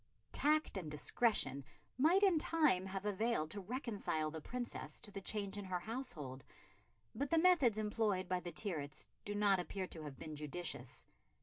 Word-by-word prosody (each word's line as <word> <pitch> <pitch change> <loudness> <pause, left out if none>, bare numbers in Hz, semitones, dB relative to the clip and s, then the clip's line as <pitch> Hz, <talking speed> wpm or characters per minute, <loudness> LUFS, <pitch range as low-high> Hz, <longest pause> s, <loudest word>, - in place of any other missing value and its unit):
Tact 305 -6 +2
and 170 -5 -4
discretion 150 - +2 0.3
might 330 +10 +5
in 370 -5 +6
time 300 - +3
have 195 +1 -4
availed 210 -6 +1
to 205 - -4
reconcile 205 - -2
the 160 0 -6
Princess 245 +7 -5
to 210 - -7
the 195 - -5
change 205 0 -1
in 200 - -5
her 185 -1 -1
household; 170 - -5 0.7
but 280 +1 -2
the 330 - +3
methods 320 - +5
employed 210 -3 +1
by 180 0 +1
the 175 -1 -5
Tyrwhitts 155 -9 -3 0.2
do 205 - -3
not 205 -2 +4
appear 185 +2 -3
to 165 -3 -6
have 145 -3 -7
been 155 -1 -6
judicious. 150 -4 -5
200 Hz, 170 wpm, -38 LUFS, 160-240 Hz, 0.7 s, in